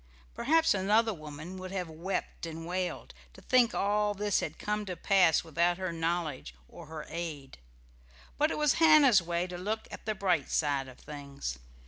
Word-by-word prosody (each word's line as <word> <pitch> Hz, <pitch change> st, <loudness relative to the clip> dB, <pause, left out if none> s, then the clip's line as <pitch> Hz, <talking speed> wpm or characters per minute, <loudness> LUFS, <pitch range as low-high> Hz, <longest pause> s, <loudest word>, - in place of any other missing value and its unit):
Perhaps 320 Hz, +4 st, +3 dB
another 210 Hz, +4 st, +2 dB
woman 155 Hz, +2 st, -8 dB
would 185 Hz, 0 st, -7 dB
have 185 Hz, -3 st, -3 dB
wept 165 Hz, +1 st, -4 dB
and 165 Hz, 0 st, -7 dB
wailed, 180 Hz, +1 st, -3 dB, 0.2 s
to -, -, -15 dB
think 250 Hz, -2 st, +3 dB
all 205 Hz, +1 st, +1 dB
this 205 Hz, 0 st, +1 dB
had 160 Hz, 0 st, -4 dB
come 210 Hz, 0 st, -2 dB
to 180 Hz, -, -4 dB
pass 180 Hz, -4 st, +3 dB
without 170 Hz, +2 st, +1 dB
her 185 Hz, -2 st, -3 dB
knowledge 165 Hz, -, -2 dB
or -, -, -12 dB
her 155 Hz, -1 st, -7 dB
aid; 155 Hz, -, -6 dB, 0.8 s
but 300 Hz, +2 st, +2 dB
it -, -, -3 dB
was 300 Hz, -2 st, +3 dB
Hannah's 295 Hz, -, +7 dB
way 170 Hz, +1 st, -1 dB
to 180 Hz, -1 st, -7 dB
look 215 Hz, +4 st, -3 dB
at -, -, -10 dB
the 215 Hz, -, 0 dB
bright 180 Hz, -7 st, +1 dB
side 140 Hz, -3 st, 0 dB
of 130 Hz, -, -12 dB
things. 140 Hz, -, -7 dB
180 Hz, 175 wpm, -30 LUFS, 160-210 Hz, 0.8 s, Hannah's